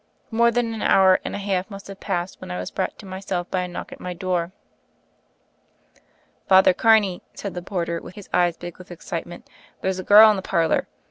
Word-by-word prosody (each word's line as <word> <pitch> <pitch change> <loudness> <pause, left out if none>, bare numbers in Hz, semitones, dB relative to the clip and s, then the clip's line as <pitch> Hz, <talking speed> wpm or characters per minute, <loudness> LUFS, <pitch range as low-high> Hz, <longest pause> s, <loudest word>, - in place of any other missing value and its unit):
More 235 +1 +4
than 235 -1 -1
an 220 - -6
hour 190 -1 +5
and - - -4
a - - -3
half 195 -1 -2
must 195 -1 -10
have 195 -1 -10
passed, 180 -2 -3
when - - -9
I 90 - -4
was 90 0 -5
brought - - -3
to - - -12
myself 185 -2 -4
by 185 - 0
a 180 - -3
knock 175 - -7
at - - -10
my 180 -1 -6
door. 180 -1 -2 2.0
"Father 190 -1 +6
Carney," 210 -4 +3
said 200 - -6
the 180 - -5
porter, 170 -2 -3
his 195 +1 -12
eyes 175 -1 +2
big 175 0 -9
with 185 - -13
excitement, 175 0 -7 0.3
"there's 190 0 -1
a - - -4
girl 215 +2 +8
in 210 - -1
the - - -3
par 170 -3 +1
lor. - - 0
185 Hz, 210 wpm, -23 LUFS, 175-200 Hz, 2.0 s, girl